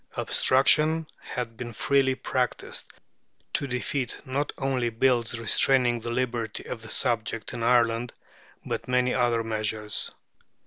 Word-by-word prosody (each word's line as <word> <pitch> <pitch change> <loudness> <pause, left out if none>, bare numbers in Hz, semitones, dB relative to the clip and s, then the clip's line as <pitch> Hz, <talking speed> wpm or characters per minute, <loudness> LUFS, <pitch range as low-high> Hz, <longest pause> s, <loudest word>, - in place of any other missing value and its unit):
Obstruction 155 +5 +3
had 120 -3 -5
been 120 -1 -6
freely 135 +2 +2
practised - - -2 0.6
to 140 - 0
defeat 125 0 -2
not 140 +2 -2
only 130 -3 0
bills 120 0 +1
restraining 120 +1 +3
the 120 - -5
liberty 120 -3 -2
of 115 - -6
the 110 - -10
subject 115 -2 0
in 120 - -5
Ireland, 120 0 +2 0.5
but - - -4
many 125 0 +2
other 120 -2 +2
measures. 110 -1 -1
120 Hz, 125 wpm, -26 LUFS, 115-130 Hz, 0.6 s, Obstruction